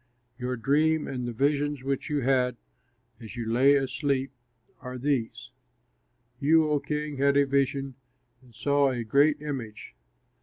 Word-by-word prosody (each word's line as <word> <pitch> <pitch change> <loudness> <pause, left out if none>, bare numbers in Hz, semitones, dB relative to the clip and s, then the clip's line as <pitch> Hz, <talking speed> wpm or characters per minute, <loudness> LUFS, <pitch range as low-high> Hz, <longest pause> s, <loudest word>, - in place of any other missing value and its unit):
Your 125 +1 -2
dream 150 +6 +1
and 125 -2 -4
the - - -3
visions 145 +2 0
which 135 +3 -3
you 145 -1 0
had 125 -1 +1 0.6
as 110 -2 -10
you 120 -1 -4
lay 135 +4 +5
asleep 135 0 -1 0.5
are 125 0 -7
these: 125 -2 -2 0.9
You, 155 +3 +4
O 150 - +2
king, 150 0 -4
had 140 +1 +3
a 140 - +4
vision 135 0 0 0.5
and 125 -3 -21
saw 140 +4 +2
a 125 -2 -3
great 145 +6 +3
image. 125 - -6
135 Hz, 145 wpm, -27 LUFS, 125-145 Hz, 0.9 s, lay